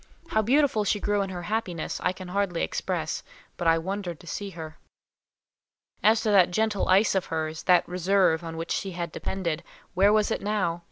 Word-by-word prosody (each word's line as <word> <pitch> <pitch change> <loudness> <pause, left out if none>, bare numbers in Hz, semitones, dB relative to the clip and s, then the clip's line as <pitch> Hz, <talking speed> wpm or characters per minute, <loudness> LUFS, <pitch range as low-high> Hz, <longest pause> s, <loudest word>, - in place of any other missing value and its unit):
How 220 - +2
beautiful 255 -1 +3
she 205 0 +1
grew 205 0 +1
in 195 - -2
her 175 -2 -6
happiness, 185 -4 -3
I 180 - +2
can 185 -1 -9
hardly 190 -2 0
express, - - -2 0.3
but 175 - -2
I 165 0 +5
wondered 180 -1 -4
to - - -15
see 200 +5 -5
her. 155 -1 -8 1.2
As 220 +1 +4
to 215 - +1
that 190 -3 +6
gentle 215 +2 0
ice 195 +4 +5
of 190 -2 0
hers—that 160 +2 +1
reserve 180 -2 +2
on 165 -1 -6
which 165 +1 -5
she 195 -2 -2
had 170 -1 -4
depended; 170 -4 -3 0.3
where 195 +3 +4
was 215 0 +2
it - - -1
now? 195 -5 -1
185 Hz, 185 wpm, -26 LUFS, 170-205 Hz, 1.2 s, that